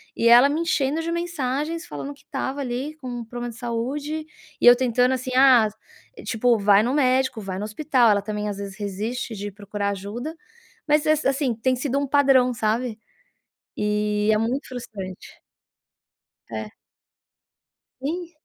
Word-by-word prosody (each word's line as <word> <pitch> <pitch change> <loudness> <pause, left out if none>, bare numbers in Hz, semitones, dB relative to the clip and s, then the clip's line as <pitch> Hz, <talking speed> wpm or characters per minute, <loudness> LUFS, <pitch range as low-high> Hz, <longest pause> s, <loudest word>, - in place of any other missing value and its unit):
e 230 - +2
ela 240 +3 +8
me 300 +3 -1
enchendo 305 -2 0
de 330 +1 -3
mensagens, 330 -1 -2
falando 285 - -6
que 285 - -22
estava 275 0 -4
ali 265 +4 -4
com 270 -4 -9
um 240 -1 -5
problema 240 +1 -5
de 225 - -14
saúde 280 +7 -3 0.4
e - - +2
eu 245 - +10
tentando 250 0 +2
assim, 255 0 -3
ah, 255 -4 +6 0.6
tipo, 240 +1 +2
"vai 200 0 +5
no 245 +3 0
médico, 260 -4 +2
vai 190 -2 -5
no 200 - -4
hospital", 245 +1 +2
ela 200 -1 +2
também 210 0 -4
às 205 -1 -4
vezes 200 -1 -7
resiste 210 +4 -4
de 205 +1 -5
procurar 205 0 -4
ajuda. 210 - -5 0.5
Mas 300 +1 +3
ess 310 0 +2
assim 270 -2 +1
tem 255 +3 +1
sido 265 +1 -2
um 280 - -2
padrão, 270 -3 +4
sabe? 225 0 -1 0.8
E, 210 0 0
é - - +3
muito 245 +6 -2
frustrante. 205 -7 -8 1.1
É. 110 -2 -5 1.3
Sim. 335 +5 -4
245 Hz, 160 wpm, -23 LUFS, 215-280 Hz, 1.3 s, eu